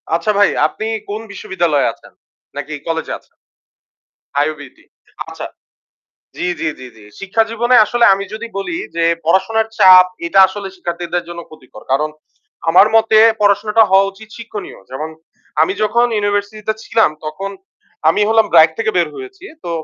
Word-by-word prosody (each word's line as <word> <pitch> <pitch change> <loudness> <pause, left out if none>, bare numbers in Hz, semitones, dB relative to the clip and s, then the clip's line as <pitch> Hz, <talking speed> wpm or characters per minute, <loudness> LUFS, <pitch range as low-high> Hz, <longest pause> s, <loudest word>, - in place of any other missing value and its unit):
আচ্ছা 170 +5 0
ভাই, 205 0 +5 0.2
আপনি 220 +7 -6 0.2
কোন 210 +2 -4
বিশ্ববিদ্যালয়ে 175 -7 0
আছেন? - - -20 0.4
নাকি 155 - -6
কলেজে 165 0 -3
আছে - - -34 1.1
IUBAT 145 -3 -7 0.5
আচ্ছা - - -7 0.9
জি, - - -3
জি, 160 - -1
জি, 130 - -10
জি। 110 - -16
শিক্ষা 195 +3 0
জীবনে 240 +2 +1
আসলে 240 +2 +1
আমি 195 +1 -5
যদি 225 +2 -6
বলি 340 - -4 0.2
যে 165 - +1 0.2
পড়াশোনার 220 +6 +1
চাপ 185 -1 +8 0.2
এটা 170 - +1
আসলে 195 0 -7
শিক্ষার্থীদের 175 -1 -4
জন্য 170 0 -7
ক্ষতিকর। 130 -8 -15
কারণ 150 +3 +1 0.6
আমার 180 +5 +6
মতে 220 -1 +4 0.2
পড়াশোনাটা 210 +2 +3
হওয়া 195 +1 +4
উচিত 210 +2 -15
শিক্ষণীয়। 225 -3 -8
যেমন 150 +5 -5 0.5
আমি 160 - +1
যখন 235 +3 +2
ইউনিভার্সিটিতে 205 +1 -2
ছিলাম 225 -7 +2
তখন 175 +6 -5 0.6
আমি 165 +6 +2
হলাম 225 0 +3
BRAC 160 0 +7
থেকে 225 -1 0
বের 170 -3 +2
হয়েছি। 390 -1 -11 0.2
তো 170 - -5
195 Hz, 150 wpm, -16 LUFS, 165-220 Hz, 1.1 s, চাপ